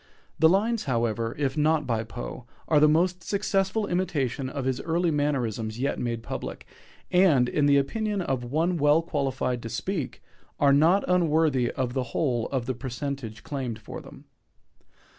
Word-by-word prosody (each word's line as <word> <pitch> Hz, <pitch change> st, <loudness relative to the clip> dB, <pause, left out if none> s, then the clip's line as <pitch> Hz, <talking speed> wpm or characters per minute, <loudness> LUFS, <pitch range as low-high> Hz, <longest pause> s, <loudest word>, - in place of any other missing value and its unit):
The 160 Hz, +1 st, +6 dB
lines, 215 Hz, +5 st, +1 dB
however, 115 Hz, -2 st, -1 dB
if 140 Hz, -2 st, -1 dB
not 155 Hz, 0 st, +2 dB
by 115 Hz, -3 st, 0 dB
Poe, 120 Hz, +2 st, -7 dB, 0.2 s
are 150 Hz, -, +4 dB
the 150 Hz, +1 st, +6 dB
most 175 Hz, +3 st, +2 dB
successful 200 Hz, +1 st, 0 dB
imitation 145 Hz, -8 st, -1 dB
of 135 Hz, -1 st, -4 dB
his 130 Hz, -1 st, -1 dB
early 170 Hz, +1 st, +1 dB
mannerisms 120 Hz, -7 st, -1 dB
yet 140 Hz, +2 st, -1 dB
made 115 Hz, -2 st, -3 dB
public, -, -, -6 dB, 0.5 s
and, 165 Hz, -9 st, +5 dB
in 145 Hz, +3 st, +1 dB
the 140 Hz, 0 st, +5 dB
opinion 210 Hz, +9 st, -1 dB
of 135 Hz, -8 st, -1 dB
one 160 Hz, +8 st, 0 dB
well 150 Hz, +2 st, +4 dB
qualified 135 Hz, -5 st, -1 dB
to 115 Hz, -, -6 dB
speak, 155 Hz, -, -4 dB, 0.4 s
"are 140 Hz, -1 st, +5 dB
not 165 Hz, +8 st, +4 dB
unworthy 160 Hz, -8 st, +2 dB
on 130 Hz, -2 st, -1 dB
the 130 Hz, +2 st, -1 dB, 0.2 s
whole 120 Hz, -7 st, +1 dB
of 130 Hz, -4 st, -2 dB
the 130 Hz, -, -1 dB
parentage 125 Hz, -3 st, -5 dB
claimed 130 Hz, -6 st, -4 dB
for 110 Hz, -, -9 dB
them." -, -, -14 dB
140 Hz, 160 wpm, -26 LUFS, 125-165 Hz, 0.5 s, The